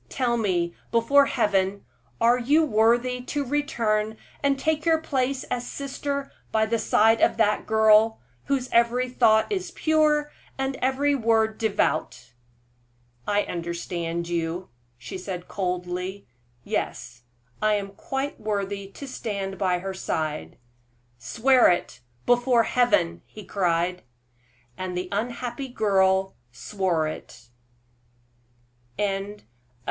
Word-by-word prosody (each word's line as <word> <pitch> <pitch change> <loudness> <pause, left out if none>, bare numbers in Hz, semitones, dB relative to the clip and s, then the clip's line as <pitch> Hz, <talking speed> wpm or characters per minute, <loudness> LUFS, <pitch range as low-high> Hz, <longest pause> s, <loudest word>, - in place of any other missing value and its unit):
Tell 245 -3 0
me, 180 -6 0 0.2
before 275 +5 +4
Heaven, 200 -4 0 0.3
are 240 +2 +4
you 295 +6 +3
worthy 240 +1 +2
to 285 0 -2
return 220 -6 0 0.2
and 280 -1 +2
take 310 +2 0
your 330 -1 +4
place 270 -3 -1
as 245 -1 -4
sister 280 0 -4 0.2
by 220 0 +2
the 230 +1 0
side 225 +1 +3
of - - +3
that 210 -2 +1
girl, 220 0 +5 0.3
whose 265 -2 0
every 235 +2 +3
thought 220 - +3
is 375 -3 -2
pure, 305 -3 +2 0.3
and 270 0 -1
every 270 +3 +1
word 225 -4 +1
devout?" 155 - -1 0.9
"I 205 0 +2
understand 170 0 -4
you," 170 +1 -3 0.3
she 125 +9 -7
said, 180 -1 -6
coldly. 180 +1 -3 0.4
"Yes, 120 0 -4 0.4
I 215 0 +3
am 200 -1 -3
quite 270 +7 -4
worthy 200 -2 -3
to 280 - -8
stand 200 -6 -4
by 185 -3 +2
her 190 +2 -5
side." 155 -5 -3 0.6
"Swear 235 - +4
it, 175 - -1 0.3
before 245 -1 +4
Heaven!" 155 - +2
he 210 -2 -11
cried. 180 -1 0 0.8
And 185 -1 -4
the 180 0 -3
unhappy 240 +5 -3
girl 190 -5 +2 0.2
swore 180 +3 -1
it! 120 -5 -9 1.5
CHAPTER 195 -1 0
XLV. 205 +1 -11
215 Hz, 120 wpm, -25 LUFS, 185-255 Hz, 1.5 s, girl